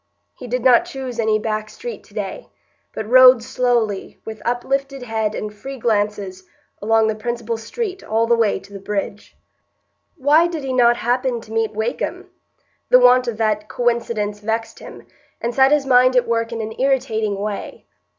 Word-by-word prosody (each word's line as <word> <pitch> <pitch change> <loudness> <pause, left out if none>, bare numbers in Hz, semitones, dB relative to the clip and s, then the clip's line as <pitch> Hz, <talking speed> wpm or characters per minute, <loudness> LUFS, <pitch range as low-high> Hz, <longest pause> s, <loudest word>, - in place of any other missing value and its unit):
He 250 - -10
did 245 0 -2
not 250 -2 +5
choose 260 -3 -6
any 220 -1 +2
back 215 0 -3
street 480 - -8
to - - -21
day, - - -5 0.4
but 215 - -6
rode 255 -1 +7
slowly, 240 -5 -1
with 220 -1 -8
uplifted 270 +2 -2
head 220 -2 -2
and 210 0 -5
free 270 +6 -8
glances, 205 -5 -2 0.4
along 225 +1 +3
the 220 - +1
principal 235 +1 -4
street 380 - -5
all 225 +1 +1
the 235 +1 +3
way 225 -3 +1
to 200 +1 -16
the 200 - -7
bridge. 200 +1 -5 0.8
Why 305 +4 +4
did 330 -4 -5
he 265 -1 -3
not 240 -1 +4
happen 250 0 0
to 220 - -15
meet 225 -1 0
Wakem? 220 +2 -3 0.6
The 250 - +8
want 250 0 +5
of 230 -3 -3
that 215 -1 -1
coincidence 230 -4 -1
vexed 225 +2 -3
him, - - -12 0.3
and 235 +1 -3
set 265 +2 +4
his 295 -2 +3
mind 255 0 +4
at 250 - +3
work 230 0 -1
in 230 -1 -4
an 220 0 -5
irritating 245 -6 0
way. 205 0 -5
230 Hz, 175 wpm, -20 LUFS, 215-255 Hz, 0.8 s, The